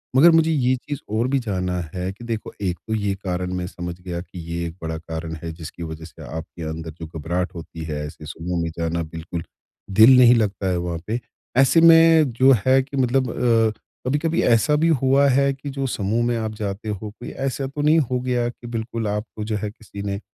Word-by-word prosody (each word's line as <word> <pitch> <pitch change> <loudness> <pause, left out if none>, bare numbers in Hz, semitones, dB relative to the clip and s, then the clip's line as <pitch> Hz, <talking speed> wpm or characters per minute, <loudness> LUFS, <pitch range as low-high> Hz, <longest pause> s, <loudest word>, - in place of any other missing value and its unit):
मगर 165 +6 +8
मुझे 165 0 +4
ये 130 -4 +2
चीज़ 145 +3 -6
और 110 +4 +1
भी 135 0 +1
जानना 90 -5 -2
है 90 +1 -3
कि 110 +5 -13
देखो, 115 -2 -4
एक 90 -3 -1
तो 110 - -2
ये 100 -2 0
कारण 90 -2 -3
मैं 90 -1 -2
समझ 85 -1 -6
गया 85 -1 -4
कि 90 0 -11
ये 85 0 -2
एक 80 - -8
बड़ा 80 0 -3
कारण 80 0 -6
है, 80 - -4
जिसकी 85 +1 -8
वजह 80 0 -7
से 80 - -14
आपके 80 +1 -7
अंदर 80 +1 -5
जो 80 - -6
घबराहट 85 +3 -3
होती 80 0 -8
है, 75 -1 -4
ऐसे 75 +1 -9
समूह 85 +3 -3
में 85 - -1
जाना, 85 0 -1
बिल्कुल 80 +1 -6 0.6
दिल 125 +4 +9
नहीं 125 -1 +8
लगता 100 -3 0
है 90 - +1
वहाँ 85 -1 -3
पे। 115 +3 -1 0.4
ऐसे 135 +5 +6
में 165 -3 +7
जो 130 +3 +5
है 130 +1 +5
कि 140 +1 -7
मतलब 130 -1 +2
अ, 115 -2 +3 0.4
कभी-कभी 150 +4 +1
ऐसा 120 +6 +4
भी 160 +3 +3
हुआ 135 +2 +4
है 140 +1 +3
कि 135 +1 -8
जो 135 0 -3
समूह 110 +1 0
में 120 -1 +1
आप 110 -1 -2
जाते 105 +1 -4
हो, 105 +1 -4
कोई 120 - -9
ऐसा 135 0 -3
तो 145 +2 -5
नहीं 155 +2 +5
हो 125 -3 0
गाया 125 -1 0
कि 120 0 -11
बिल्कुल 115 -1 -3
आपको, 105 +1 -4
जो 110 0 -2
है, 105 0 -3
किसी 105 -2 -10
ने 100 -1 -2
110 Hz, 220 wpm, -22 LUFS, 85-130 Hz, 0.6 s, दिल